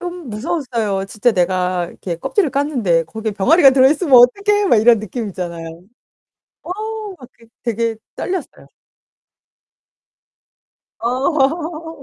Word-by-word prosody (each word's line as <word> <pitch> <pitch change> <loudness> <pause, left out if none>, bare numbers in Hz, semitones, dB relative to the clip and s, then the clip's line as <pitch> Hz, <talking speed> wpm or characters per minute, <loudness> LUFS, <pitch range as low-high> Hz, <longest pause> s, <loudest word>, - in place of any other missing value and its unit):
좀 355 -5 -7
무서웠어요. 225 - -2
진짜 220 +4 0
내가 180 -1 0
이렇게 170 0 -6
껍질을 320 - 0
깠는데 245 - 0
거기에 220 +5 -5
병아리가 270 - +5
들어있으면 270 +3 +3
어떡해? 400 - +5
막 - - +5
이런 230 +1 +5
느낌 215 +1 -5
있잖아요. 170 -3 -6 1.0
어 - - -11 0.5
막 250 - -12
그 230 - -22 0.2
되게 230 -1 -1 0.2
떨렸어요. 370 -1 -5 2.3
어. 310 +5 -1
245 Hz, 265 characters per minute, -18 LUFS, 200-310 Hz, 2.3 s, 병아리가